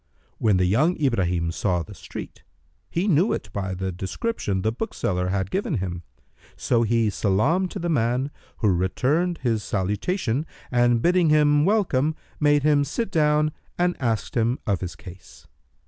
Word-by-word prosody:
When 105 -4 +3
the 90 - +2
youth 140 - +2
Ibrahim 90 - +1
saw 90 -1 0
the - - -11
street, - - -9 0.5
he 175 +5 -1
knew 180 +2 +3
it - - -5
by 95 -2 -3
the 95 +1 -3
description 95 - -3
the 110 - +1
bookseller 95 - -2
had 95 0 -1
given 190 -5 -1
him; 90 -4 -3 0.5
so 120 -2 +1
he 115 -1 +2
salamed 135 - +1
to - - -6
the 175 -2 -3
man, 130 -2 0 0.3
who 105 - +2
returned 135 - +1
his 115 -4 +1
salutation 110 - -1 0.2
and 120 -1 +3
bidding 175 -2 +4
him 150 -1 +4
welcome, 160 -8 +2 0.2
made 145 -1 +3
him 145 -1 +4
sit 190 - -3
down 150 -2 +2 0.3
and 175 0 +1
asked 115 -4 -1
him 120 +2 +1
of 100 -4 0
his 90 -2 -5
case. 90 0 -13
120 Hz, 160 wpm, -24 LUFS, 95-155 Hz, 0.5 s, bidding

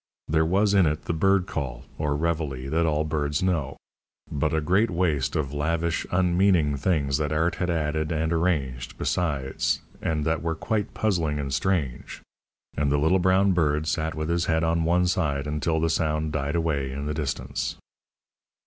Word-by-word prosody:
There 80 +1 +2
was 100 +3 +2
in 95 -4 +5
it 75 0 -1
the - - -1
bird 95 +3 +3
call, 65 -9 -5
or 75 -2 0
reveille, 75 -4 -2
that 80 +1 +2
all 75 -1 +1
birds 75 0 -1
know; 75 -8 0 0.5
but 75 +1 0
a 80 - +1
great 95 +9 +2
waste 80 -6 0
of 70 -3 -1
lavish, 85 +3 -1
unmeaning 90 -4 +3
things 70 -3 +1
that 75 -1 -1
art 80 +3 +1
had 90 - -1
added 80 -1 -1
and 80 +1 0
arranged, 70 -8 -1
besides, 70 -6 -1 0.2
and 75 -2 -1
that 80 -1 0
were 80 0 -1
quite 105 +4 -2
puzzling 85 -9 0
and 70 -2 -3
strange; 80 -9 -2 0.5
and 70 -1 +1
the 75 - +3
little 80 +6 +3
brown 95 +2 +3
bird 75 -4 +1
sat 80 0 -1
with 80 0 -3
his 85 +1 +1
head 80 0 +1
on 80 0 +1
one 90 +2 +3
side 75 -7 0
until 75 +2 0
the 80 - +1
sound 75 -1 0
died 70 0 -1
away 75 -5 0
in 70 +2 -5
the 75 - -2
distance. 75 -4 -3
80 Hz, 175 wpm, -25 LUFS, 75-85 Hz, 0.5 s, in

